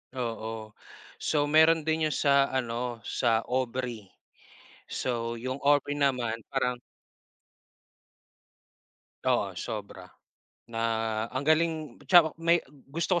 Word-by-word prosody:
Oo. 115 -3 -4 0.5
So, 150 -2 +1
meron 160 +1 +6
din 160 0 +1
'yung 155 - -2
sa 140 -1 +4
ano 120 -2 -3
sa 115 -2 +1
Aubrey. 125 -4 -3 0.8
So 115 -2 -2
'yung 130 +2 -3
Aubrey 145 0 +3
naman 125 -5 +1 0.2
parang 125 -2 0 2.5
oo, - - +1
sobra. - - -6 0.6
Na 115 -1 -4 0.5
ang 130 +2 -3
galing, 155 -1 +1 0.2
tsaka 170 -4 +7
may 170 +1 +5 0.3
gusto 170 +3 0
130 Hz, 100 wpm, -28 LUFS, 120-155 Hz, 2.5 s, tsaka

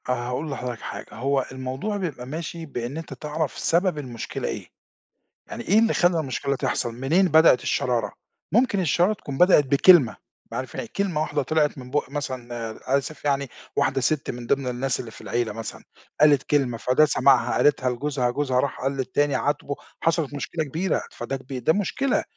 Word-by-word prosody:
أنا 120 -1 -1
هاقول 140 +5 -3
لحضرتك 125 -3 -5
حاجة، - - -6
هو 135 +2 0
الموضوع 130 +11 -3
بيبقى 155 -10 -4
ماشي 165 +3 -5
بإن 125 -1 -5
أنت 165 - -6
تعرَف 150 0 -3
سبب 175 -1 +1
المشكلة 125 -6 -5
إيه، - - -5 0.8
يعني - - -6
إيه 205 +5 +5
اللي 225 0 +3
خلّى 175 -1 +3
المشكلة 140 -1 -2
تحصَل، 130 -3 -1
منين 150 +10 +2
بدئت 160 -5 +6
الشرارة، 120 -3 0 0.4
ممكن 230 -1 +3
الشرارة 175 +4 +3
تكون 140 -9 -7
بدئت 180 -4 +6
بكلمة 140 - +5 0.2
معرف - - -5
كلمة 190 -6 -2
واحدة 150 -1 0
طلعِت 150 +1 +1
من 125 -1 -9
بُق 145 -2 0
مثلًا 130 -4 -5 0.2
آآ، 130 +4 -1
آسف 150 +2 -6
يعني 140 -2 +1 0.3
واحدة 135 0 +1
سِت 145 +4 0
من 120 -1 -8
ضِمن 135 0 +1
الناس 125 +1 -1
اللي 115 - -6
في - - -13
العيلة 110 +1 -1
مثلًا، 115 +1 -7 0.4
قالت 145 -3 +6
كلمة، 135 -5 +1
فده 130 +6 +4
سمَعها 130 -5 +3
قالتها 135 -3 +3
لجوزها، 125 0 -1
جوزها 130 -1 0
راح 140 +1 -2
قال 135 - 0
للتاني 135 +2 0
عاتبه، 145 0 -1 0.3
حصلِت 165 -3 +1
مشكلة 155 +3 -3
كبيرة، 160 +6 -1
فده 135 - -4
كب 130 -1 -7
ده 160 - +4
مشكلة 245 +7 0
140 Hz, 175 wpm, -24 LUFS, 125-160 Hz, 0.8 s, بدئت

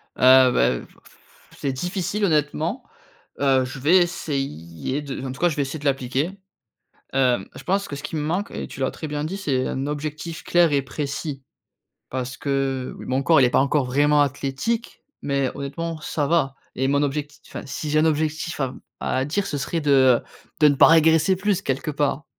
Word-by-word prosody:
Ah, 130 0 +7
beh, - - 0
heu, - - +1
f - - -19 0.2
pff - - -20 0.4
c'est 135 -2 -1
difficile 185 +7 -2
honnêtement, 150 - 0 0.6
heu, 135 -2 +3
je 130 +1 -7
vais 160 +8 +5
essayer 135 - -2
de 140 -2 -6
en 130 - -3
tout 130 - -9
cas 175 - +4
je 155 - -3
vais 145 - 0
essayer 140 +3 -3
de 145 - -11
l'appliquer, 135 +4 0 0.8
hem, 130 -2 +2
je - - -10
pense 200 +2 0
que 145 - -6
ce 140 - -8
qui - - -5
me 155 - -1
manque 180 +8 -1
et - - -5
tu - - -11
l'as 130 - 0
très 155 - -7
bien 150 0 -3
dit, 185 +6 -3
c'est 135 -9 -1
un 135 +2 -3
objectif 155 +2 -5
clair 175 -2 +3
et 140 -1 +2
précis 140 0 -5 0.7
parce 130 0 -4
que, 135 -2 -2
oui, - - -9
mon 130 +1 0
corps 160 +1 +5
il - - +6
est - - 0
pas - - +3
encore 140 0 +2
vraiment 145 +3 +3
athlétique 145 - -2 0.2
mais 140 -2 0
honnêtement 160 +4 -5
ça 150 -1 -2
va 140 -4 +1 0.2
et 135 +1 0
mon 140 +1 +2
objectif 145 +1 -3
enfin - - -7
si 150 +2 -4
j'ai 155 - +3
un 155 - +4
objectif 155 +1 -1
à 135 - +2
m 130 - -9 0.2
à 130 +1 0
dire 190 +7 -1
ce 145 - -3
serait 165 +4 -2
de, 145 - 0
heu, 130 -3 +5 0.4
de 150 - +7
ne 145 - +3
pas - - +7
régresser 160 +3 +5
plus 200 0 0
quelque 135 +2 -2
part. 145 0 -1
145 Hz, 210 wpm, -23 LUFS, 135-160 Hz, 0.8 s, Ah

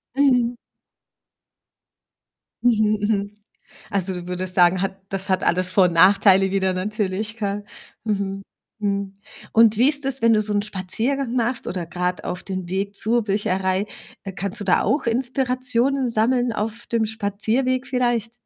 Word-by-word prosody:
Mhm. 250 -4 +3 2.1
Mhm, 215 -3 +3
mhm. 205 -1 -1 0.6
Also, 195 -1 -1
du 175 -1 -7
würdest 180 0 -3
sagen, 180 0 +4
hat 195 0 -3
das 195 0 -1
hat 185 -1 +1
alles 180 +1 +1
Vor 190 - +5
und 175 - +2
Nachteile 190 +2 +5
wieder 190 -1 +1
natürlich, 210 +3 -3
gell? 205 -2 -3 0.4
Mhm, 195 -2 -2 0.4
mhm 200 -1 -3 0.3
und 225 -1 +5
wie 250 +5 +4
ist 290 -1 -2
es, 270 -2 0
wenn 230 0 +5
du 215 - +4
so 210 0 -3
'nen 205 - +1
Spaziergang 225 +7 -2
machst 240 0 -1
oder 180 -2 -4
grad 180 +1 -3
auf 180 +1 -4
dem 185 -2 -5
Weg 195 +2 -2
zur 235 +3 +1
Bücherei? 195 -1 0 0.4
Äh, 195 - -5
kannst 195 +2 -3
du - - -4
da 185 - +3
auch 290 - 0
Inspirationen 255 +1 +1
sammeln 240 +2 +1
auf 220 +2 -4
dem 230 -1 +1
Spazierweg 220 +5 -1
vielleicht? 240 -3 0
205 Hz, 155 wpm, -22 LUFS, 190-235 Hz, 2.1 s, Vor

